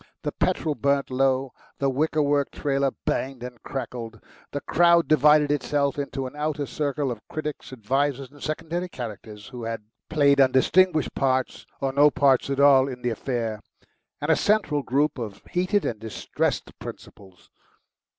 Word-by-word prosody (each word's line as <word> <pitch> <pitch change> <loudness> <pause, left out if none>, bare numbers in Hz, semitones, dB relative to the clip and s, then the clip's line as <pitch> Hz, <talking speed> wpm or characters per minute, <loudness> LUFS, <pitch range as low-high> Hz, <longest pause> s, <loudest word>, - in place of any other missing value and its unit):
The - - -1
petrol 155 - 0
burnt 140 -1 0
low, 135 0 +1 0.2
the 140 - 0
wicker 150 +3 +1
work 145 -1 +1
trailer 140 -1 0 0.2
banged 130 -2 -2
and 125 -1 -8
crackled. 120 -5 -6 0.3
The 145 - -3
crowd 170 0 +4
divided 150 0 +5
itself 145 -1 0
into 135 -1 -3
an 130 - -7
outer 150 -1 -2
circle 145 -2 -2
of 115 -3 -6
critics, 150 -3 -5
advisers, 135 +3 -1
and 145 -1 -17
secondary 165 +3 -3
characters, 110 - -8
who 125 -3 -7
had 115 -1 -4 0.3
played 140 -3 +4
undistinguished 155 +6 +3
parts 130 -1 -1
or 135 -1 -1
no 145 +2 +6
parts 140 -2 +3
at 140 0 -1
all 140 -2 +6
in 125 -2 -7
the 120 - 0
affair, 115 -2 -3 0.6
and - - 0
a - - +5
central 205 -9 +1
group 140 +2 0
of 110 -4 -6
heated 185 +3 +1
and 110 - -2
distressed 110 -1 -2
principals. 95 -3 -12
140 Hz, 155 wpm, -25 LUFS, 125-150 Hz, 0.6 s, no